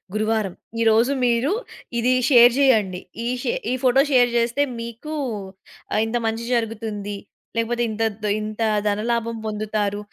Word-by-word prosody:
గురువారం 215 -3 0 0.3
ఈరోజు 230 +3 +4
మీరు 240 +7 +2 0.5
ఇది 250 +2 +3 0.2
షేర్ 240 -3 +7
చేయండి. 210 -9 +3 0.2
ఈ - - -1 0.2
షే - - 0 0.3
ఫోటో 265 +2 +5
షేర్ 245 -2 +5
చేస్తే 235 +4 +1 0.2
మీకు 235 +7 -6 0.8
ఆహ్, 215 - +2
ఇంత 230 +2 -1
మంచి 225 +1 -2
జరుగుతుంది. 220 -3 -3 0.4
లేకపోతే 235 +1 0
ఇంత 220 +1 -2 0.2
ద్ - - -1 0.2
ఇంత 215 +1 -5 0.3
ధనలాభం 230 +2 -1
పొందుతారు. 210 -1 -2
230 Hz, 130 wpm, -22 LUFS, 215-240 Hz, 0.8 s, షేర్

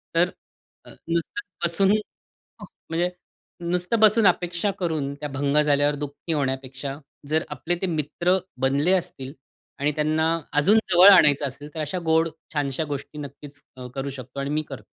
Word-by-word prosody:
तर 175 +2 +4 0.6
अ, - - -13 0.2
नुसतंच 170 +7 -3 0.2
बसून 190 +3 +2 1.0
म्हणजे 170 +2 +1 0.5
नुसतं 180 +5 0
बसून 215 +1 +5
अपेक्षा 175 +2 +1
करून 155 -6 -1
त्या 150 +1 -6
भंग 140 +1 0
झाल्यावर 145 0 +2
दुःखी 145 +3 -4
होण्यापेक्षा, 135 -1 -3 0.3
जर 155 +1 +1
आपले 160 +5 -2
ते - - +1
मित्र 170 +3 0 0.2
बनले 140 +6 +2
असतील 175 -7 -2 0.5
आणि 145 +2 +1
त्यांना 155 +1 +1 0.3
अजून 155 +9 +4 0.2
जवळ 180 +3 +9
आणायचं 145 -6 +6
असेल 145 +3 -9
तर, - - -4
अशा 155 +4 -2
गोड 160 +1 +3 0.2
छानश्या 145 0 -1
गोष्टी 145 0 -6
नक्कीच 145 0 -10 0.2
अ, 125 -1 -7
करू 135 +1 -3
शकतो 130 0 -8
आणि 140 0 -2
मी 150 +1 0
करतो. - - -8
150 Hz, 150 wpm, -24 LUFS, 140-175 Hz, 1.0 s, जवळ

